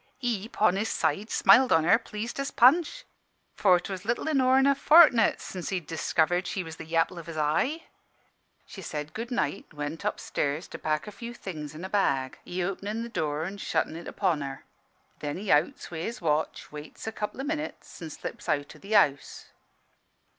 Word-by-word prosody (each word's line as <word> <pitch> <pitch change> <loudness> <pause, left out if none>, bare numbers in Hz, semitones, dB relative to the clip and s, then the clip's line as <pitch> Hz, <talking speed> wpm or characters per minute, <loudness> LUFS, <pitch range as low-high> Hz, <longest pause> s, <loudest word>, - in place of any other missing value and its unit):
He, 230 -5 -2
'pon 205 -5 +2
his 215 +2 -1
side, 165 +8 -1
smiled 260 0 +5
on 160 -1 +5
her, 180 +7 +5
pleased 225 +2 -6
as 275 0 -1
Punch; 305 - +4 0.5
for 185 -3 +4
'twas 185 0 -6
little 240 +7 -1
inore'n 265 -3 +4
a 280 - +5
fortni't 275 -5 +6
since 180 -2 -6
he'd 180 -4 -2
discovered 170 +3 0
she 190 - -2
was 160 -1 -9
the - - -9
yapple 165 +1 +1
of 170 - -11
his 165 -1 -7
eye. 160 - 0 0.8
She 195 - -10
said 150 -3 -5
'Good 230 +2 -5
night' 240 -5 -2
an' 150 - -21
went 145 +4 -4
up 210 - -1
stairs 145 +4 -2
to - - -8
pack 155 -1 -1
a 210 - -7
few 235 +2 -8
things 155 -8 -7
in 170 +4 -7
a - - -3
bag, 140 -10 0
he 180 0 -3
openin' 200 +4 -3
the 235 - -6
door 155 -6 -2
and 195 +4 -6
shuttin' - - -1
it 170 - -8
upon 175 -7 0
her. 135 -1 -6 0.5
Then 145 +1 -4
he 200 +1 -2
outs 150 +4 +1
wi' 160 - -5
his 230 +7 -4
watch, 155 -2 -1
waits 150 0 -9
a 220 - -2
couple 210 +2 -5
o' - - -2
minutes, 305 - -5
an' 165 - -5
slips - - -7
out 145 +1 -1
o' - - -15
the 200 +5 -6
house. 140 -9 +2
185 Hz, 200 wpm, -27 LUFS, 155-230 Hz, 0.8 s, fortni't